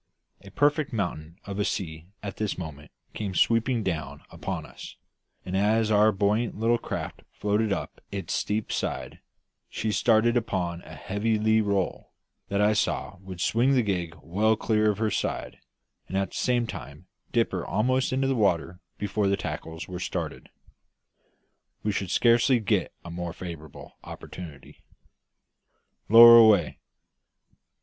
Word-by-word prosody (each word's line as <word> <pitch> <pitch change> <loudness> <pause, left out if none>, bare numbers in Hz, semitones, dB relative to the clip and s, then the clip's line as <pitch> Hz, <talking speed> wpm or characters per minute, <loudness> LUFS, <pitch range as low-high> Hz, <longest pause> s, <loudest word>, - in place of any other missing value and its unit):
A 100 - -11
perfect 145 +7 +1
mountain 85 -6 -4
of 100 0 -5
a - - +2
sea 80 -4 -4 0.2
at 100 -2 -6
this 105 -3 -2
moment 75 -4 -8 0.2
came 100 -3 -4
sweeping 115 +2 +2
down 75 -6 -4
upon - - -5
us, - - -11 0.5
and 95 - -4
as 110 +2 +2
our 105 +1 +5
buoyant 105 +4 0
little 115 +2 +2
craft - - -5
floated 105 +1 0
up - - -4
its 100 -1 -4
steep 105 0 -1
side, - - -3 0.5
she 110 - -2
started 115 +3 +3
upon 90 -7 -1
a 80 - -12
heavy 100 +7 -1
lee 110 +1 +3
roll, 100 -3 -2 0.4
that 100 - 0
I 105 +1 +4
saw 105 -1 -1
would 95 -2 -9
swing 125 +8 +2
the 125 - +3
gig 90 -5 -2
well 105 +7 +2
clear 110 0 +1
of 105 - 0
her 110 -1 0
side, - - -3 0.5
and 95 - -3
at 95 0 -1
the - - -10
same 125 -2 +1
time 75 -5 -9 0.3
dip 115 -1 +1
her 90 -3 -3
almost 130 +7 0
into 135 +1 0
the 135 - +2
water 90 - 0 0.2
before 105 0 -1
the 100 0 +2
tackles 80 -3 -6
were 90 -1 -6
started. - - -4 1.3
We 105 - 0
should 95 -2 -3
scarcely 120 +4 +4
get 110 - 0
a 85 - -7
more 85 0 -5
favourable 80 -5 -10
opportunity. 75 -6 -10 1.3
"Lower 115 +1 +11
away." 110 -7 +5
105 Hz, 150 wpm, -26 LUFS, 90-110 Hz, 1.3 s, Lower